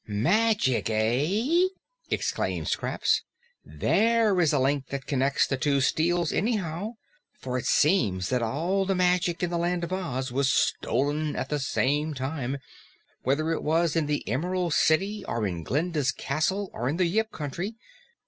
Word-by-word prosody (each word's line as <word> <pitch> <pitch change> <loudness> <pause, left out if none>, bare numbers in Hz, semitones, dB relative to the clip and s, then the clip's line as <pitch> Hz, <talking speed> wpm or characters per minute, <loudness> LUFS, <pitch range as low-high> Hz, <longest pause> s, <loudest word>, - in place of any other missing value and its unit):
"Magic, 130 - +2
eh?" 165 - +2 0.4
exclaimed - - -1
Scraps. - - 0 0.4
"THERE 220 -3 +2
is 160 - +3
a 145 - +2
link 135 0 +1
that 140 -1 -5
connects 135 -1 +1
the 135 - -2
two 140 +1 +1
steals, 170 +5 +1
anyhow, 200 0 -1 0.4
for 125 -1 -5
it - - -7
seems 105 - +2
that 125 -1 +1
all 165 +12 0
the 195 - +1
magic 180 -1 +1
in 175 - 0
the 170 - 0
Land 175 0 0
of 170 +2 -3
Oz 135 -9 -3
was 135 +1 +2
stolen 145 +6 0
at - - -3
the 150 - -1
same 145 +3 0
time, 135 0 -3 0.6
whether 155 +5 0
it 165 - -1
was 165 +1 +1
in 160 -3 +1
the 150 0 -2
Emerald 175 - -1
City 195 +8 +2
of 115 -2 -2
in 90 -4 -3
Glinda's 145 - 0
castle 185 +11 -1
or 120 +2 -2
in 150 - -1
the 185 - +3
Yip 220 +6 0
Country. 175 +9 -5
155 Hz, 160 wpm, -27 LUFS, 135-180 Hz, 0.6 s, is